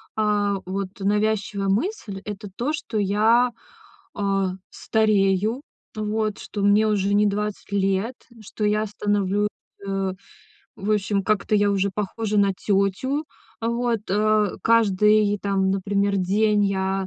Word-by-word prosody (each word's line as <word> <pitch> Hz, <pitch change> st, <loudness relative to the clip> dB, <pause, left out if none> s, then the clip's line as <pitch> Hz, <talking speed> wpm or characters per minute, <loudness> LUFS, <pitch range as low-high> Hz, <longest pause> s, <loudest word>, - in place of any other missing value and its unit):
а 205 Hz, -2 st, +1 dB
вот 190 Hz, 0 st, -3 dB
навязчивая 205 Hz, 0 st, 0 dB
мысль— 210 Hz, -, -2 dB
это 205 Hz, -1 st, -6 dB
то, 280 Hz, +6 st, -1 dB
что 255 Hz, -8 st, -4 dB
я, 220 Hz, +5 st, +3 dB, 0.6 s
а, 195 Hz, -2 st, 0 dB, 0.2 s
старею, 215 Hz, +2 st, +1 dB, 0.3 s
вот, 215 Hz, 0 st, -1 dB
что 205 Hz, -, -6 dB
мне 210 Hz, +2 st, +4 dB
уже 200 Hz, -1 st, +1 dB
не 210 Hz, +1 st, +4 dB
20 210 Hz, 0 st, -3 dB
лет, 195 Hz, +4 st, 0 dB, 0.3 s
что 210 Hz, +1 st, -4 dB
я 210 Hz, +1 st, +1 dB
становлюсь, 205 Hz, 0 st, 0 dB, 0.4 s
а, 195 Hz, -1 st, -1 dB, 0.6 s
в 205 Hz, +2 st, -3 dB
общем, 200 Hz, -1 st, 0 dB
как-то 215 Hz, +1 st, 0 dB
я 205 Hz, 0 st, +3 dB
уже 200 Hz, 0 st, +1 dB
похожа 210 Hz, +1 st, -2 dB
на 200 Hz, -1 st, +3 dB
тётю. 200 Hz, +10 st, 0 dB, 0.4 s
А 230 Hz, -, -1 dB
вот, 235 Hz, -2 st, 0 dB
э, 210 Hz, 0 st, +2 dB
каждый 210 Hz, -2 st, +3 dB
там, 195 Hz, -1 st, 0 dB
например, 200 Hz, +1 st, 0 dB
день 205 Hz, +3 st, +2 dB
я 190 Hz, 0 st, -1 dB
205 Hz, 130 wpm, -23 LUFS, 195-215 Hz, 0.6 s, мне